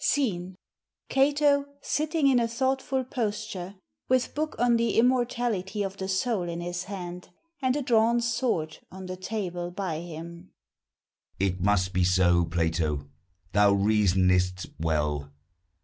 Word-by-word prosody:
SCENE. 190 -10 0 0.5
CATO, 285 +1 +3 0.2
_sitting 310 -1 +1
in 260 -3 +5
a 235 - +1
thoughtful 265 +2 0
posture, 210 -6 -4 0.3
with 255 -1 +2
book 305 +1 -2
on 240 0 +3
the 230 0 0
Immortality 235 -5 +1
of 195 0 -5
the 190 - -4
Soul 190 -1 0
in 170 0 -4
his 175 +1 -4
hand, 180 -2 -7 0.3
and 260 0 +2
a 290 - -1
drawn 235 -1 +3
sword 230 -10 -1
on 190 0 -9
the 185 0 -5
table 185 -3 -4
by 175 -3 -3
him_. 170 +1 -8 0.9
It 95 -1 0
must 95 -1 +2
be 90 0 +2
so 90 -1 +4
Plato, 80 -3 -1 0.4
thou 100 0 +5
reasonest 95 -3 +2
well! 75 -3 -1
185 Hz, 135 wpm, -27 LUFS, -, 0.9 s, in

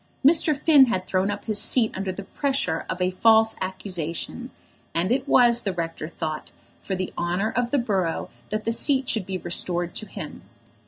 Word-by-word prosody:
Mr. 305 -1 +5
Finn 290 -4 +6
had 185 -6 -1
thrown 190 +1 0
up 205 - -5
his 210 -2 +1
seat 225 0 +2
under 190 0 -3
the 200 +2 -7
pressure 265 - -2
of 185 - -3
a 180 - +1
false 220 +3 +4
accusation, 185 -3 -4 0.5
and 175 +5 0
it 265 +2 0
was, 240 -3 +5
the 195 -4 -2
rector 165 -2 -4
thought, 155 -2 -5 0.3
for 190 - -3
the 185 0 -4
honour 180 +5 -1
of 240 +1 -1
the 285 - +1
borough 195 -9 -1 0.2
that 215 0 -3
the 230 - +1
seat 265 +2 +1
should 215 -5 -1
be 190 -1 -3
restored 175 0 0
to 215 - -4
him. - - -8
200 Hz, 190 wpm, -24 LUFS, 180-235 Hz, 0.5 s, Finn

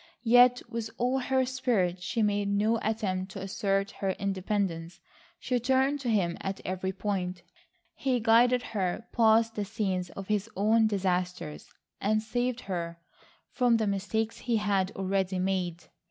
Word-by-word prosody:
Yet 245 +1 +6
with 230 -1 -4
all 250 +2 +1
her 260 0 +1
spirit 235 -9 0
she 220 +5 -1
made 205 -1 +1
no 215 +3 +2
attempt 195 -4 -2
to 195 - -6
assert 195 +1 -1
her 195 -1 +1
independence. 185 -4 -2 0.4
She 250 -1 0
turned 265 +4 +2
to 255 -3 -3
him 185 -6 +1
at 195 0 -3
every 190 +1 -2
point. 185 -2 -3 0.5
He 255 -2 0
guided 240 +2 +4
her 200 +2 -1
past 225 0 +4
the 210 - -2
scenes 195 -4 -2
of 195 -1 -8
his 210 0 0
own 220 +3 +4
disasters 180 -5 -2 0.3
and 215 +2 +2
saved 245 +2 -1
her 170 -3 -4 0.5
from 245 -3 +3
the 220 - 0
mistakes 210 +3 -1
he 235 -2 0
had 200 -3 +1
already 190 -1 -1
made. 180 -2 -1
205 Hz, 150 wpm, -29 LUFS, 190-230 Hz, 0.5 s, Yet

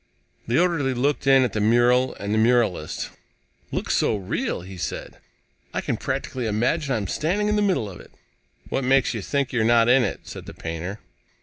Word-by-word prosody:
The 120 +3 +1
orderly 165 -7 +1
looked 140 +3 0
in 135 -1 +6
at 125 - -1
the 110 - -1
mural 120 +3 +3
and 100 +1 -3
the 110 - +2
muralist. 110 -9 +1 0.6
"Looks - - -1
so - - +2
real," 95 -3 -2
he 95 +2 -10
said, 90 - -5 0.6
"I - - 0
can - - -1
practically 125 -3 -3
imagine 130 +7 0
I'm 105 -3 -2
standing 180 - 0
in 210 - +2
the 210 - +2
middle 190 - +1
of 95 -3 -9
it." - - -14 0.6
"What 135 - -1
makes 135 +1 +3
you 110 - -3
think 140 +5 -1
you're 120 -2 +2
not 115 0 +4
in 125 +1 +5
it?" 105 - -3
said - - -9
the - - -9
painter. 85 +5 -5
120 Hz, 195 wpm, -24 LUFS, 105-135 Hz, 0.6 s, in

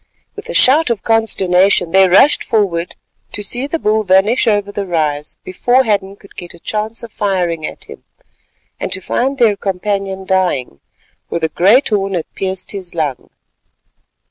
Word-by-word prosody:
With 430 +2 -9
a - - -4
shout 285 +3 +5
of 230 -4 -2
consternation 190 -5 +2
they 190 0 +5
rushed 265 +11 +4
forward 180 -6 -1 0.4
to 210 - -4
see 245 +6 -2
the 330 - -2
bull 215 -6 0
vanish 200 +6 +2
over 205 -2 +1
the 200 -1 -4
rise 150 -4 -2
before 245 +8 +1
Hadden 200 -4 -1
could 200 0 -19
get 175 -1 -9
a - - -17
chance 215 +5 -3
of 230 - -9
firing 180 -7 -2
at - - -9
him, - - -13 0.8
and - - -4
to 185 - 0
find 265 +8 -2
their 230 -5 +3
companion 195 0 -3
dying, 180 - -1 0.5
for - - -2
the 160 -1 -1
great 215 - +3
horn 195 -3 -1
had 170 - -2
pierced 190 -1 -4
his 185 -4 -7
lung. 145 -6 -3
195 Hz, 170 wpm, -15 LUFS, 180-220 Hz, 0.8 s, shout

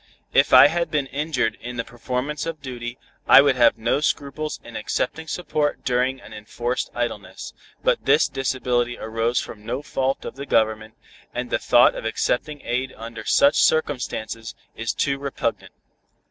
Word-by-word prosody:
If - - +4
I - - +10
had 170 +3 +1
been 150 -3 0
injured 135 -4 -2
in 120 0 -7
the 115 - -1
performance 125 +6 -4
of 165 -2 -4
duty, 120 -3 -6 0.3
I - - +9
would 140 -1 +4
have 120 -2 +4
no 115 +5 +1
scruples 150 +1 -2
in 120 - -11
accepting 160 +8 -2
support 155 -3 -2
during 130 +1 +1
an 110 - -13
enforced 120 +4 -3
idleness, 110 -6 -4 0.3
but - - +2
this - - +4
disability 125 -2 -1
arose 115 +2 -1
from 105 - -8
no 125 +6 -4
fault 135 -2 -2
of - - -7
the 140 +1 -6
Government, 110 0 +1 0.4
and - - -4
the - - +1
thought - - +5
of - - -7
accepting 140 +6 -1
aid 130 +2 -2
under 115 +1 -8
such 140 - +4
circumstances 125 -7 -1 0.2
is 115 0 -2
too 140 -1 -1
repugnant." 140 -1 -3
125 Hz, 160 wpm, -23 LUFS, 115-140 Hz, 0.4 s, I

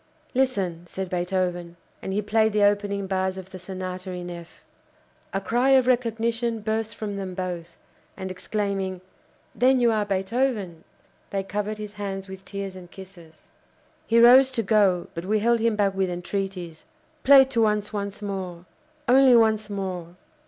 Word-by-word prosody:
"Listen!" 195 -10 0
said 190 +1 -5
Beethoven, 175 -1 -2 0.2
and - - -4
he 205 +2 -1
played 220 +1 +2
the 210 -1 +3
opening 205 -1 +1
bars 190 0 -1
of 190 0 -9
the 185 - -8
Sonata 185 0 -6
in 180 -1 -6
F. 170 -1 -11 0.7
A 195 - -1
cry 250 +6 +3
of 260 - +3
recognition 235 -1 0
burst 220 +1 -2
from 205 -2 -5
them 190 -2 -5
both, 175 -2 -5 0.4
and 190 -1 -5
exclaiming: 195 -1 -3 0.5
"Then 260 +1 +3
you 240 -1 +4
are 215 -1 +1
Beethoven!" 200 -2 -1 0.4
they 195 -1 -2
covered 210 +2 -3
his 210 -1 -7
hands 195 -2 -5
with 190 0 -10
tears 195 -2 -6
and 180 -2 -11
kisses. 175 -5 -14 0.6
He 230 - +3
rose 255 +3 +8
to 230 - +1
go, 195 -4 +3
but 170 +1 -6
we 215 +3 +1
held 235 +2 +2
him 225 -1 +1
back 200 -2 +1
with 190 -1 0
entreaties. 180 -2 -4 0.4
"Play 275 0 +9
to 230 -4 +1
us 210 0 -1
once 200 0 -4
more 185 -3 -5 0.4
only 260 0 +6
once 220 -2 +3
more!" 185 -4 -5
200 Hz, 160 wpm, -25 LUFS, 185-220 Hz, 0.7 s, Play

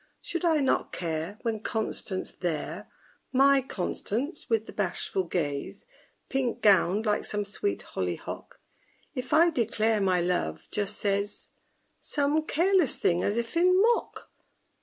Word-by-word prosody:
_ - - -34 0.2
Should 340 - -3
I 320 -3 +3
not 265 - +1
care 165 +3 -3
when 225 -2 -1
CONSTANCE 215 -3 -2
there, 165 -4 -3 0.4
My 275 +1 +5
CONSTANCE, 250 - -3
with 225 -1 +2
the - - -10
bashful 190 -1 -1
gaze, 165 +3 -3 0.4
Pink 265 -3 -1
gowned 200 +1 +4
like 210 -1 +1
some 205 -1 -2
sweet 395 - -2
hollyhock, - - -5 0.5
If 255 -3 -5
I 335 +2 +6
declare 225 -5 +1
my 185 -2 +3
love, 170 - -1
just 205 0 -2
says 200 0 -1 0.5
Some 295 +2 0
careless 355 -2 +3
thing 175 0 +1
as 205 - 0
if 235 +3 -3
in 365 +2 +5
mock? 465 +3 +1
220 Hz, 140 wpm, -28 LUFS, 190-280 Hz, 0.5 s, I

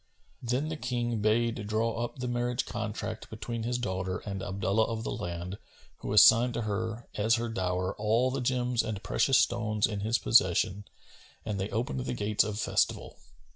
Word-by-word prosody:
Then 125 +5 -1
the 160 - -4
King 120 -3 -2
bade 110 0 +1
draw 115 +2 0
up 120 - -5
the 125 -1 -3
marriage 120 +1 -1
contract 110 -1 -5
between 115 +1 -5
his 120 +2 -1
daughter 95 -5 -2
and 100 -2 -4
Abdullah 100 +2 0
of 110 0 -4
the - - -3
Land[FN#252] 85 +2 -5 0.4
who - - -6
assigned 120 +1 +7
to 120 - -1
her, 110 +2 -3
as 110 +3 +3
her 120 0 -2
dower, 90 -2 -1
all 115 +5 +2
the 135 0 -2
gems 125 -1 +1
and 110 -2 -5
precious 135 -2 +3
stones 110 -3 +2
in 105 -2 -3
his 110 +4 +1
possession, 95 -2 +3 0.6
and 105 -3 -3
they 95 +2 -2
opened 125 +4 -2
the 125 0 -3
gates 105 -2 +2
of 105 -2 -4
festival. - - 0
110 Hz, 175 wpm, -29 LUFS, 105-120 Hz, 0.6 s, assigned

